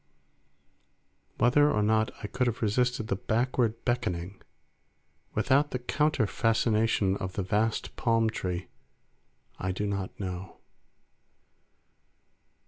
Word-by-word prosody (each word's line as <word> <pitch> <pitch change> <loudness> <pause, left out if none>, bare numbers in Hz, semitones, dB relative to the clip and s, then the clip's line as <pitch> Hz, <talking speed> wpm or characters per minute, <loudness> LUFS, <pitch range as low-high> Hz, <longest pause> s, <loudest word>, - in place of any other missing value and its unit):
Whether 145 +5 +4
or 105 - +1
not 110 +1 +2
I - - -2
could 125 +4 0
have 120 0 -2
resisted 120 +1 +1
the 95 - 0
backward 115 +2 0
beckoning 95 -6 -2 0.9
without 140 +6 +3
the 125 - -2
counter 150 +1 +1
fascination 110 -2 +2
of 95 -1 -5
the 100 - -2
vast 105 +4 0
palm 115 -1 +2
tree, 90 -4 -4 0.9
I 95 - -1
do 100 +3 -2
not 100 -2 -3
know. 95 -1 -5
110 Hz, 110 wpm, -29 LUFS, 100-120 Hz, 0.9 s, Whether